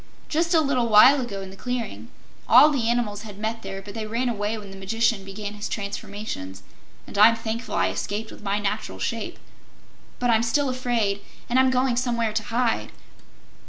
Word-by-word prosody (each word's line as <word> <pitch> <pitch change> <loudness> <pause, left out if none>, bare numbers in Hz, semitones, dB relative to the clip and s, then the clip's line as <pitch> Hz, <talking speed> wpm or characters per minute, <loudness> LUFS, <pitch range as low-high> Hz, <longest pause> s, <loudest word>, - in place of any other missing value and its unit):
"Just 335 +2 +1
a 320 - +6
little 255 -5 +1
while 255 +6 +7
ago 200 -6 -5
in 190 - -9
the - - -11
clearing. 245 +3 -4 0.4
All 305 - +8
the 240 -6 0
animals 225 -4 0
had 210 -3 -10
met 220 +2 -3
there, 195 0 -7
but 200 0 -9
they 220 -1 -4
ran 240 +3 -1
away 210 -1 -2
when 205 -2 -9
the - - -10
Magician 225 +2 0
began 205 +1 -6
his 210 0 -5
transformations, 200 - -5 0.4
and - - -11
I'm 225 +2 +8
thankful 225 +1 -4
I - - +2
escaped 215 +2 -4
with - - -12
my 200 -1 -1
natural 205 -1 -3
shape. - - -3 0.8
But 245 -1 +1
I'm 225 -1 +4
still 265 +4 +1
afraid, 235 -6 0 0.3
and 250 +2 +2
I'm 260 0 +5
going 255 -1 +1
somewhere 235 -3 0
to 220 0 -1
hide." 235 0 0
225 Hz, 190 wpm, -24 LUFS, 205-245 Hz, 0.8 s, All